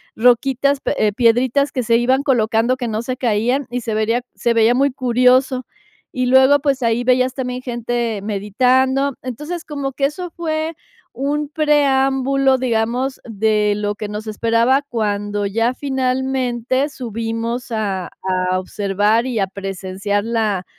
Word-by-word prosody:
roquitas, 265 +4 +2
pe - - -2
eh, 210 -1 +2
piedritas 245 +5 +2
que 255 - -2
se 230 +1 +3
iban 260 +3 +2
colocando, 235 -2 +2
que 250 -2 -4
no 220 +1 -2
se 255 +1 -4
caían, 245 +3 0
y 245 0 -3
se 225 -1 -3
vería 225 +3 +1
se 235 -1 0
veía 225 +1 +4
muy 275 +3 +2
curioso. 255 +1 +2 0.5
Y 255 -1 -1
luego, 265 +3 +6
pues, 275 -2 0
ahí 230 0 +1
veías 255 +1 +2
también 250 -1 -4
gente 235 -3 -2
meditando. 255 +7 +1
Entonces, 300 +8 -6
como 280 -3 -4
que 275 - 0
eso 335 +5 -4
fue 320 -1 -3 0.4
un 290 +2 -2
preámbulo, 275 -3 +2
digamos, 245 +2 -1
de 215 -1 +1
lo 205 0 -2
que 210 0 -5
nos 210 +1 -6
esperaba 230 +5 +2
cuando 205 -3 -2
ya 230 +5 0
finalmente 260 0 -1
subimos 230 -1 -4
a 200 -5 -2
a 185 0 0
observar 205 +4 0
y 245 -4 -2
a 195 - +1
presenciar 195 +1 -3
la 215 -5 -1
245 Hz, 145 wpm, -19 LUFS, 220-265 Hz, 0.5 s, luego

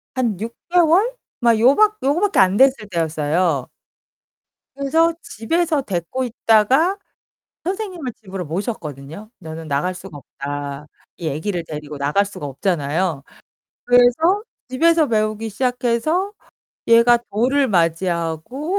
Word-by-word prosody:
한 235 -7 0
6 230 +2 -5 0.2
개월? 355 +6 +4 0.3
막 235 -2 +4
요 255 +5 +5
밖 430 0 +3
요거 285 +5 +2
밖에 410 -1 +2
안 190 0 +4
됐을 265 -5 +3
때였어요. 160 -3 0 1.1
그래서 325 +4 +2
집에서 310 +7 -1
데리고 195 +5 -3
있다가 250 - +2 0.7
선생님을 365 - -4
집으로 190 -2 -6
모셨거든요. 165 - -6
'나는 160 -1 -8
나갈 150 +6 -1
수가 180 -4 -10
없다.' 145 +1 -6 0.3
이 165 -3 -4
애기를 170 +4 -3
데리고 150 -2 -7
나갈 145 +9 +1
수가 195 -7 -7
없잖아요. 155 +1 -1 0.6
그래서 245 - +4 0.3
집에서 325 +4 +3
배우기 215 0 -1
시작해서 250 - 0 0.6
얘가 235 +1 +6
돌을 260 +6 +1
맞이하고 170 - -1
215 Hz, 270 characters per minute, -20 LUFS, 165-275 Hz, 1.1 s, 얘가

